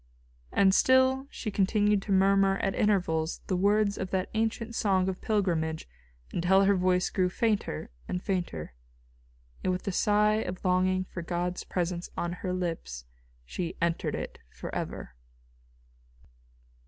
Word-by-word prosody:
And 190 -1 +4
still 260 +3 +4
she 215 - -5
continued 205 +1 +2
to 200 - -5
murmur 195 0 +4
at 195 -1 -1
intervals 175 -6 +1
the 185 - -1
words 200 +2 +2
of 190 - -3
that 185 0 -2
ancient 225 +1 -1
song 190 -4 +2
of 190 -1 -3
pilgrimage 170 -7 0 0.5
until 190 +3 +4
her 200 +1 +4
voice 180 0 +1
grew 185 -2 +1
fainter 205 - -1 0.2
and 180 - -2
fainter, 175 - -3 0.9
and 185 - +1
with 180 - -2
the 195 - -2
sigh 210 +3 +3
of 180 -1 -6
longing 185 0 +2
for 185 -1 -7
God's 175 +1 -2
presence 175 -1 -3
on 175 0 -2
her 180 +1 -4
lips 165 - -4 0.4
she 170 - -4
entered 170 0 0
it - - -6
forever. 65 - -6
185 Hz, 140 wpm, -29 LUFS, 180-205 Hz, 0.9 s, And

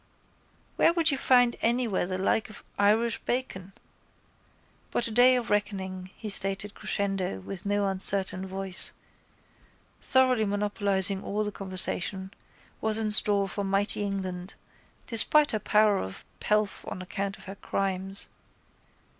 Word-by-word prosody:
Where 335 - +4
would 335 -2 +3
you 275 - -1
find 245 -3 +4
anywhere 230 -6 0
the 185 0 -3
like 195 +4 0
of 215 - -12 0.2
Irish 220 +3 +2
bacon? 195 -7 -4 1.2
But 240 - -1
a - - -5
day 250 +3 +6
of 245 -4 -2
reckoning, 190 -3 -2
he 220 - -8
stated 195 0 -2
crescendo 195 - -3
with 185 - -7
no 205 0 0
uncertain 190 0 -2
voice, 190 -1 -4 1.1
thoroughly 255 -4 +2
monopolising 200 -1 +2
all 210 +2 -2
the 210 - -3
conversation, 190 0 -2 0.5
was 220 0 +2
in 220 -1 0
store 205 -1 +7
for 200 +1 -4
mighty 195 +2 +2
England, 190 -2 -5 0.5
despite 290 +6 +3
her 215 - -1
power 210 -1 +2
of 95 - -7
pelf 210 -1 -1
on 185 - -6
account 195 +1 -4
of - - -16
her 195 - -7
crimes. 195 0 -1
200 Hz, 135 wpm, -27 LUFS, 190-215 Hz, 1.2 s, store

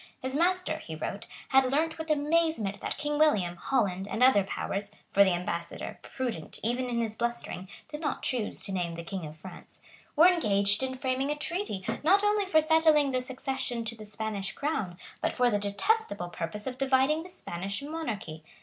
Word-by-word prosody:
His 260 0 -3
master, 365 +3 +2
he 160 - -7
wrote, 200 +7 -5 0.2
had 265 -1 +4
learnt 320 +3 +1
with 320 0 -5
amazement 300 -8 +1
that - - -3
King 295 0 -1
William, 200 - +3
Holland 195 -5 0
and 225 +4 0
other 255 -6 +6
powers, 200 +1 -3 0.2
for 200 - +7
the 195 - +3
ambassador, 175 -1 -4
prudent 235 - -4
even 245 +3 0
in 235 -1 0
his 220 -1 -2
blustering, 235 -6 -3 0.2
did 300 0 -7
not 300 - -2
choose 245 -5 -1
to 200 - -3
name 175 -3 -1
the 170 0 -6
King 175 -2 -5
of 155 +1 -11
France, 185 +3 -12 0.4
were 315 +3 +7
engaged 205 - +4
in 260 0 -1
framing 260 +1 0
a 295 - +1
treaty, 295 - -3 0.2
not 390 +7 +5
only 415 -1 +2
for 315 -4 +5
settling 315 -2 +4
the 255 -1 0
succession 260 -2 -3
to 230 +1 -4
the 215 -1 -10
Spanish 210 -2 -4
crown, 220 - -2 0.2
but - - -1
for 245 -1 +4
the 205 - +2
detestable 205 - 0
purpose 210 +5 -5
of 255 -1 -5
dividing 270 +3 +3
the 360 - -10
Spanish 195 - -4
monarchy. 220 - -5
250 Hz, 185 wpm, -29 LUFS, 200-300 Hz, 0.4 s, for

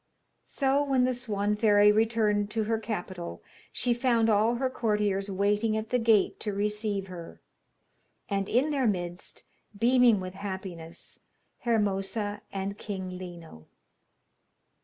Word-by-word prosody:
So 275 +1 +1
when 270 -3 +2
the 255 0 +2
Swan 210 -4 -1
fairy 210 -1 +5
returned 215 -2 +2
to 220 +1 -1
her 220 +1 0
capital 185 -5 -5 0.3
she 245 - +1
found 235 -2 +2
all 215 +3 +3
her 260 +2 0
courtiers 210 -5 0
waiting 205 +3 +1
at 220 0 -5
the 250 - +3
gate 225 -3 +3
to 210 - -3
receive 210 0 -1
her, 175 -3 -10 0.9
and 195 -1 -1
in 270 +6 +2
their 270 -4 +1
midst, 175 -3 -4 0.3
beaming 240 -1 +5
with 185 0 -6
happiness, 190 -4 -7 0.4
Hermosa 205 -2 -1
and 195 +1 -4
King 190 -3 -5
Lino. 170 - -10
210 Hz, 130 wpm, -28 LUFS, 195-230 Hz, 0.9 s, fairy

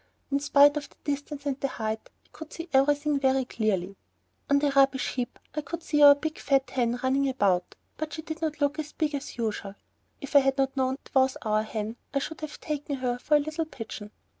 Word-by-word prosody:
In 280 - +2
spite 290 +1 +5
of 285 - -5
the - - -24
distance 285 0 -4
and 280 -1 -1
the 275 - 0
height, 220 -3 -4 0.2
I - - -27
could 320 -1 -10
see 335 +1 -7
everything 290 +2 +3
very 265 -1 +2
clearly. 195 -5 -1 0.5
On 280 - +5
the 285 0 +2
rubbish 270 -1 +3
heap 250 -1 -3 0.2
I 300 - -2
could 335 +2 -6
see 295 -2 +1
our 285 0 +10
big 310 +2 -4
fat 275 -1 +1
hen 245 -1 0
running 270 +1 +2
about, 195 -8 +1 0.2
but 310 0 -4
she 315 - -5
did 315 +1 -6
not 315 -1 -2
look 290 +1 +1
as 300 -1 -5
big 310 -2 -1
as 280 -2 -5
usual; 210 -3 -3 0.4
if 280 0 -8
I - - +11
had 270 0 +1
not 270 0 +1
known 260 -1 +1
that 275 - -18
it - - -32
was 265 0 +4
our 215 -1 +2
hen, 220 +1 -4 0.2
I - - +4
should 315 +3 -4
have 305 -1 -6
taken 295 -1 -3
her 250 -2 -2
for 300 - +2
a - - +6
little 310 +2 -2
pigeon. 220 -7 -8
275 Hz, 230 wpm, -27 LUFS, 250-295 Hz, 0.5 s, I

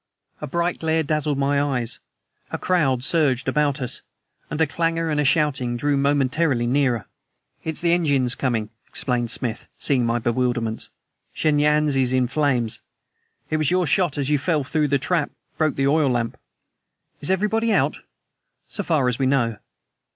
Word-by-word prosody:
A 150 - -4
bright 170 +4 -1
glare 160 0 +1
dazzled 150 -1 -1
my 140 +1 +2
eyes. 125 -5 -1 0.5
A - - -3
crowd 135 -9 +1
surged 135 -5 +1
about 145 +1 +1
us, 125 -1 -4 0.5
and 150 - -4
a 160 - +5
clangor 165 +2 -1
and 150 -2 +1
shouting 135 -6 +1
drew 145 +3 +1
momentarily 140 -1 +1
nearer. 125 -3 +1 0.6
"It's 160 -1 -4
the 170 -1 +3
engines 140 -8 +2
coming," 115 -6 -1 0.2
explained 120 -2 -1
Smith, 120 -1 -3
seeing 130 -4 +2
my 115 0 +1
bewilderment. 120 -1 -1 0.4
"Shen 150 -2 +1
Yan's 150 -1 +3
is 130 -1 +2
in 130 -1 +3
flames. 125 -5 0 0.7
It 155 - +2
was 155 -3 +2
your 180 0 +2
shot, 165 0 +1
as 140 -2 -1
you 150 0 +2
fell 150 0 0
through 150 +3 0
the 140 - +2
trap, 150 +2 0 0.3
broke 155 -3 +1
the 135 - 0
oil 145 0 +3
lamp." 120 -2 -1 0.8
"Is 145 - -2
everybody 210 +4 +1
out?" - - +2 0.7
"So 205 - -4
far 155 -9 +1
as 125 0 -1
we 135 - +2
know." 120 -5 +1
140 Hz, 165 wpm, -23 LUFS, 125-155 Hz, 0.8 s, a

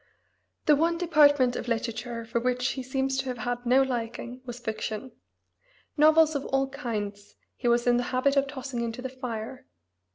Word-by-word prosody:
The 300 - +6
one 335 +3 +1
department 290 -7 +4
of - - -4
literature 230 0 -3
for 230 +1 -1
which 250 +1 0
he 265 - -3
seems 265 +1 -1
to 270 - -1
have 250 -1 -3
had 245 +1 -3
no 260 +2 +5
liking 245 0 -4
was 245 0 -6
fiction. 220 +1 -4 0.8
Novels 315 +1 +5
of 285 -2 -2
all 270 0 +1
kinds 210 -7 -5 0.2
he 245 - -3
was 240 0 +3
in 240 -1 +4
the 245 - 0
habit 265 +2 +2
of 275 0 +3
tossing 265 -3 -5
into 235 +1 -4
the 260 - -3
fire. 250 -2 -6
250 Hz, 175 wpm, -27 LUFS, 235-270 Hz, 0.8 s, The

